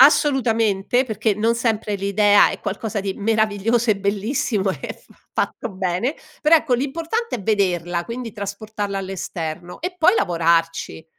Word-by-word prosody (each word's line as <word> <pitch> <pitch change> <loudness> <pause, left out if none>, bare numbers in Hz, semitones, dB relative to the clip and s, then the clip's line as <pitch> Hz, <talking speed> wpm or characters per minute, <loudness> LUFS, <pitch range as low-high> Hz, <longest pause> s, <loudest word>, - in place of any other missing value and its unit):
Assolutamente, 245 -5 +4
perché 220 -2 0
non 225 +3 +1
sempre 220 -3 0
l'idea 205 +1 +4
è - - -6
qualcosa 205 +1 -3
di 195 -1 -3
meraviglioso 220 +2 +1
e 205 - +3
bellissimo 200 0 0
e - - -6
fa - - -22 0.3
fatto 235 - -8
bene, 190 - -1 0.3
però, 310 +2 +5
ecco, 295 -5 +3
l'importante 330 - -2
è 205 - -9
vederla, 175 -4 0
quindi, 235 0 -5
trasportarla 205 -1 -4
all'esterno, 175 -3 -5
e 360 +2 -4
poi, 350 +5 +5
lavorarci. 165 -2 +1
210 Hz, 140 wpm, -21 LUFS, 195-235 Hz, 0.3 s, però